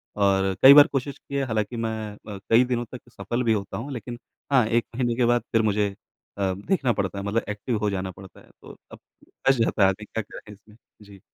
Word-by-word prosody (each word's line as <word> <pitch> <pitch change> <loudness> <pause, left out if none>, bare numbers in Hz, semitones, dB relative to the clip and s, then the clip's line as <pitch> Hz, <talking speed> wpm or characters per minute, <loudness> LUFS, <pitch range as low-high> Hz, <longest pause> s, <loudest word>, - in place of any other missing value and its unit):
और 95 -2 +2
कई 135 +1 +11
बार 145 +2 +9
कोशिश 140 0 -3
की 140 - -10
है, 140 - +1
हालाँकि 110 0 -2
मैं 115 -1 -2 0.4
अ, - - -7
कई 115 +2 +6
दिनों 120 -1 -2
तक 125 -1 -11
सफल 120 +1 -3
भी 115 - +2
होता 100 -2 -4
हूँ, 135 +6 -6
लेकिन 120 +1 -7 0.3
हाँ, 130 -4 +4
1 115 +1 +1
महीने 120 -2 0
के 125 0 +2
बाद 120 0 +2
फिर 115 - +3
मुझे 105 -1 +1 0.5
अ, 95 -2 0
देखना 120 - 0
पड़ता 100 -1 -3
है, - - -5
मतलब 105 +3 0
एक्टिव 105 +3 -3
हो 105 0 0
जाना 95 -1 -3
पड़ता 95 +1 -14
है। - - -20
तो - - -12 0.2
अब - - -12 0.3
फँस 135 0 0
जाता 115 -3 +1
है 95 - +6
आदमी, 105 +3 -5
क्या 115 - -4
करे 105 +1 -12
इसमें? 105 +1 -20 0.3
जी। 100 -2 -15
110 Hz, 235 wpm, -24 LUFS, 100-120 Hz, 0.5 s, कई